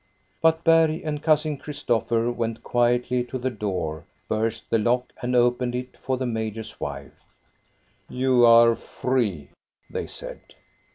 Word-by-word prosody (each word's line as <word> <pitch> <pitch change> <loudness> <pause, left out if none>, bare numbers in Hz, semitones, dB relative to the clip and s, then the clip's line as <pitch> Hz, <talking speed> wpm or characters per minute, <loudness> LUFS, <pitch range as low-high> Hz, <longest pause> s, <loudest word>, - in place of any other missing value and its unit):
But 160 0 +3
Berg 165 -1 +4
and 150 -2 -3
Cousin 155 -1 +2
Christopher 120 -5 -1
went 115 -1 -3
quietly 120 +1 +1
to 130 - -5
the 130 +1 -2
door, 90 -9 -3 0.2
burst 110 +1 -2
the 115 - +3
lock, 125 +3 0
and 125 0 -1
opened 120 0 +2
it 125 0 -5
for 130 0 -2
the 130 - -2
major's 110 -1 -4
wife. - - -6 0.5
" - - -40 0.3
You 130 -1 +2
are 115 0 +7
free," 110 - -2 0.4
they - - -4
said. - - -9
120 Hz, 145 wpm, -24 LUFS, 115-130 Hz, 0.5 s, are